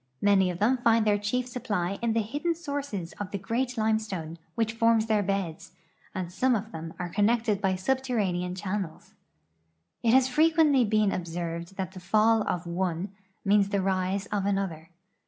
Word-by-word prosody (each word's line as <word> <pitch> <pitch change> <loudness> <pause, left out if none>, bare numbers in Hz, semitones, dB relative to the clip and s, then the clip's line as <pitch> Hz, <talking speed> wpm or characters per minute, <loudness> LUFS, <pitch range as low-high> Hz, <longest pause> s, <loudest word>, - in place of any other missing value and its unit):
INlany 195 -2 +4
of 175 - -6
them 230 +7 +3
find 230 -2 +3
their 205 -1 +3
chief 240 +5 -1
su})ply 200 -7 -2
in 235 -1 +1
the 225 -1 +1
hidden 295 +10 -2
sources 285 - -4
of 205 -2 -4
the 200 - -3
great 240 +6 -2
limestone 215 -7 -1 0.2
which 225 -1 0
forms 230 -1 +3
their 215 -2 +2
beds, 195 -5 -3 0.4
and 180 -2 -4
some 255 +5 +2
of 220 +1 -4
them 165 -3 -6
are 175 -1 -5
con 205 0 +3
nected 225 -3 +1
by 190 -2 +1
subterranean 195 -6 -1
channels. 190 -3 -5 0.9
It 230 +1 +4
has 260 -1 +5
frequently 300 -1 +4
been 215 -2 +2
ob 175 -2 -3
served 170 +1 -5
that 190 -3 -4
the 190 - -9
fall 215 +4 +3
of 175 -1 -2
one 175 +1 -2 0.3
means 200 0 +4
the 200 - 0
rise 190 +1 0
of 200 -1 0
another. 190 -5 -2
205 Hz, 175 wpm, -27 LUFS, 185-230 Hz, 0.9 s, has